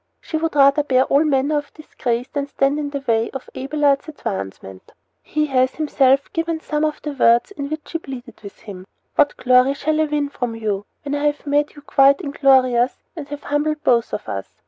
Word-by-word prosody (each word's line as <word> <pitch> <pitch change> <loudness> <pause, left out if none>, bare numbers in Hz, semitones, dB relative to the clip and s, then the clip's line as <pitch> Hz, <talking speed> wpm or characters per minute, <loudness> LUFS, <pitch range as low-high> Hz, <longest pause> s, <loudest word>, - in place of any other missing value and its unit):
She - - -7
would 320 -1 -1
rather 280 +1 +5
bear 260 -3 +3
all 280 +3 +3
manner 290 0 +1
of 290 - -11
disgrace 250 -5 -3
than 285 0 -3
stand 280 +1 0
in 290 -1 -3
the 280 -1 -4
way 225 -1 +1
of 270 - -7
Abelard's 280 +1 0
advancement. 95 - -7 0.3
He 305 0 -1
has 260 -2 +1
himself 275 -3 +2
given 330 0 -1
some 300 -1 -2
of 305 -1 -1
the 300 - -3
words 240 +1 +3
in 280 -8 -5
which 310 0 -5
she 330 - -3
pleaded 260 -4 -10
with 200 -2 -12
him: 190 -3 -10 0.3
What 290 -1 +2
glory 255 +2 +4
shall 310 +2 0
I - - +3
win 295 -1 -1
from 245 -4 -4
you, 210 -3 -3 0.2
when 285 -1 -4
I 290 0 -1
have 295 +1 -2
made 290 +1 0
you 290 - -13
quite 275 -1 +4
inglorious 265 -3 +2
and 305 -4 -7
have 290 0 -8
humbled 300 +1 -1
both 235 -2 +2
of - - -5
us? 95 -1 -4
280 Hz, 205 wpm, -20 LUFS, 255-295 Hz, 0.3 s, rather